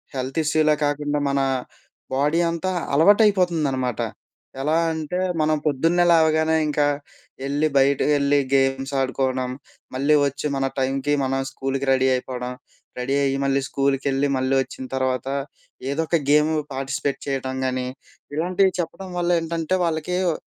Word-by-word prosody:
Health 130 +2 -4
ఇష్యూలే 155 0 +3
కాకుండా 145 0 -1
మన 140 0 +1 0.7
body 145 +5 +2
అంతా 170 +3 -2 0.2
అలవాటు 200 +9 +6
అయిపోతుందనమాట. 155 - +1 0.6
ఎలా 150 +3 +1 0.2
అంటే 160 +2 -3 0.2
మనం 155 0 +2
పొద్దున్నే 165 +5 +2
లేవగానే, 160 -1 +3
ఇంకా 150 0 +1 0.6
ఎళ్లి 145 +3 +1
బయటకి 140 +2 +3
ఎళ్లి 140 0 +3
గేమ్స్ 135 0 +1
ఆడుకోవడం, 130 -1 -1 0.4
మళ్ళీ 140 +3 +2
ఒచ్చి 140 +2 -3
మన 135 0 0
టైంకి 135 +2 0
మనం 135 0 0
స్కూల్‌కి 135 0 -3
రెడీ 130 0 +3
అయిపోవడం. 125 0 -4 0.5
రెడీ 130 +2 -1
అయ్యి 135 0 +1
మళ్ళీ 140 0 +2
స్కూల్‌కి 140 0 0
ఎళ్లి 135 +1 +1
మళ్ళీ 130 +1 0
ఒచ్చిన 130 - -9
తర్వాత 130 -1 -1 0.6
ఏదో 155 +3 0
ఒక 170 - +2
గేము 150 +2 +4 0.2
పార్టిసిపేట్ 135 +1 -2
చేయటం 130 -1 -2
గానీ, 130 0 -2 0.5
ఇలాంటివి 185 +4 +2
చెప్పడం 185 +3 -4
వల్ల 175 0 0
ఏంటంటే, 165 +2 -1
వాళ్ళకి‌ 165 +2 -1
వ్ - - +1
140 Hz, 140 wpm, -23 LUFS, 135-160 Hz, 0.7 s, అలవాటు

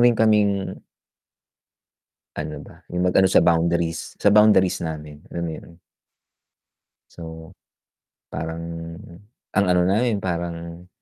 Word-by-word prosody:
rin 120 -1 +5
kaming 105 -3 +2 1.5
ano - - -5
ba, - - -16
yung 90 +1 0
ma - - +3
ano 95 0 +5
sa - - +6
boundaries, 85 0 +1
sa - - +3
boundaries 105 -4 +5
namin 75 -2 -6
alam 85 0 -3
yun? 85 +1 -9 1.3
So, 80 -1 -10 0.8
parang 80 +2 -4 0.9
ang 100 -1 +2
ano 90 0 +4
na 95 +4 +2
rin, 120 -4 +1
parang, 85 -1 -5
85 Hz, 115 wpm, -23 LUFS, 85-100 Hz, 1.5 s, sa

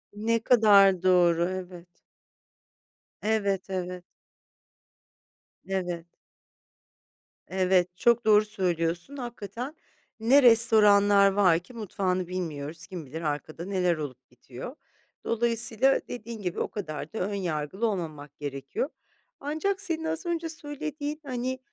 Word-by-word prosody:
Ne 225 +2 +1
kadar 200 -6 +5
doğru, 175 -2 +4
evet. 180 -2 -7 1.3
Evet, 200 -3 0
evet. 180 -1 -4 1.6
Evet. 180 -3 -3 1.4
Evet, 185 -1 +1
çok 235 +1 +3
doğru 215 -1 +5
söylüyorsun 180 - -2
hakikaten 240 - -6 0.4
ne 260 +6 +5
restoranlar 205 -4 +6
var 190 -4 +4
ki 180 +8 -17
mutfağını 185 -5 -2
bilmiyoruz. 165 -2 -5
Kim 180 -5 -7
bilir 155 +5 -7
arkada 155 +2 -4
neler 185 -3 +1
olup 130 -5 -8
bitiyor? 125 - -10 0.5
Dolayısıyla 235 +2 +2
dediğin 235 -2 -7
gibi 180 -3 -3
o - - 0
kadar 155 -7 -6
da 220 - -4
ön 200 +3 -2
yargılı 180 +2 -2
olmamak 155 -8 -5
gerekiyor. 140 - -4 0.5
Ancak 315 +8 -2
senin 330 -4 -1
az 320 +2 -3
önce 335 -1 -2
söylediğin, 300 -1 -5
hani, 255 0 -3
195 Hz, 110 wpm, -27 LUFS, 175-235 Hz, 1.6 s, restoranlar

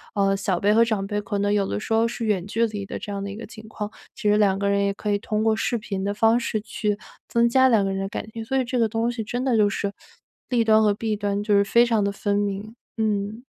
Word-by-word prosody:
呃， 195 -1 +2
小 195 -2 -1
辈 205 +3 +3
和 230 +2 +6
长 220 -4 -1
辈 205 0 -2
可 205 0 -3
能 205 0 +1
有 205 -1 +2
的 100 - -2
时 225 - -3
候 225 +1 +3
是 230 0 -4
远 200 -5 0
距 230 +2 +1
离 205 -2 -5
的 - - -6
这 - - -8
样 200 0 -4
的 200 - -4
一 - - -7
个 230 - -7
情 215 0 -12
况， 210 -1 -5 0.3
其 210 - 0
实 210 - +4
2 200 -2 +3
个 200 0 +1
人 200 0 +2
也 200 - 0
可 210 - -5
以 205 - +2
通 215 +1 -1
过 220 -1 +3
视 235 - -1
频 195 -3 -4
的 200 - -1
方 225 +2 +3
式 225 -2 -2
去 210 -1 -2 0.3
增 235 0 +3
加 260 +2 +4
2 220 -5 +3
个 195 - -1
人 195 - -2
的 195 - -3
感 210 - -5
情。 225 0 -6
所 265 +4 -1
以 260 - +2
这 250 +1 -2
个 225 - +2
东 225 +2 0
西 235 -2 -4
真 245 +4 -3
的 255 -3 +2
就 210 -1 +4
是 200 0 -3 0.6
利 240 -2 +2
端 220 -1 +5
和 210 -1 +4
弊 215 +1 -2
端， 205 -1 -1
就 210 -1 +2
是 200 - +5
非 235 +4 +4
常 225 -4 +1
地 200 - 0
分 200 0 -1
明。 205 +2 -3 0.2
嗯。 215 +1 -1
210 Hz, 305 characters per minute, -24 LUFS, 200-225 Hz, 0.6 s, 和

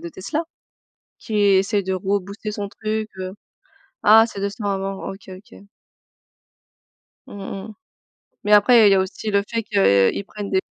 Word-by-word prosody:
de 170 - -6
Tesla? 295 - -4 0.8
Qui 215 - -5
essaie 200 +1 +3
de 190 0 -2
rebooster 200 +2 -3
son 205 -1 -4
truc, 215 +1 -4
heu 185 0 -5 0.7
ah, 220 +2 +7
c'est 200 - -8
2 200 0 -1
ans 205 - -1
avant. 195 0 -3
OK, 195 0 -13
OK. 190 +1 -13 1.6
Mmh 195 0 -7
mh, 220 - -10 0.7
mais 210 - +1
après 215 +1 +7
il - - +4
y - - +6
a 190 - +3
aussi 190 +3 -4
le 200 -1 +2
fait 230 -1 -2
qu'il 190 - +2
prenne 205 -1 -7
des 190 -1 +2
200 Hz, 160 wpm, -21 LUFS, 190-210 Hz, 1.6 s, ah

